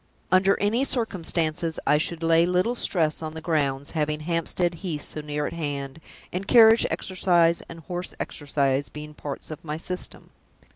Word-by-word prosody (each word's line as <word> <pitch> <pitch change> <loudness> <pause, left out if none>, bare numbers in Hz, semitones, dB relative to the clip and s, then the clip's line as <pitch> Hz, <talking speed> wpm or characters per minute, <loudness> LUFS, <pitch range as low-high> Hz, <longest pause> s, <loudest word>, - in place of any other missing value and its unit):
Under 190 +2 +4
any 220 +6 +1
circumstances, 170 - 0
I 150 - +4
should 165 +1 -2
lay 165 0 +4
little 180 +6 +1
stress 165 -10 +1
on 155 0 -5
the - - -5
grounds, 145 -4 -1
having 150 -1 -1
Hampstead 170 +2 0
Heath 160 -6 -3
so 155 - -3
near 150 0 -3
at - - -4
hand, 145 -2 -4 0.3
and 190 +2 -3
carriage 225 -2 +7
exercise 175 -3 +2
and 165 0 -9
horse 180 +2 -5
exercise 140 -1 -1
being 150 0 -9
parts 145 +1 -7
of 155 - -8
my 155 -1 -4
System. 180 +2 -5
165 Hz, 160 wpm, -25 LUFS, 150-180 Hz, 0.3 s, carriage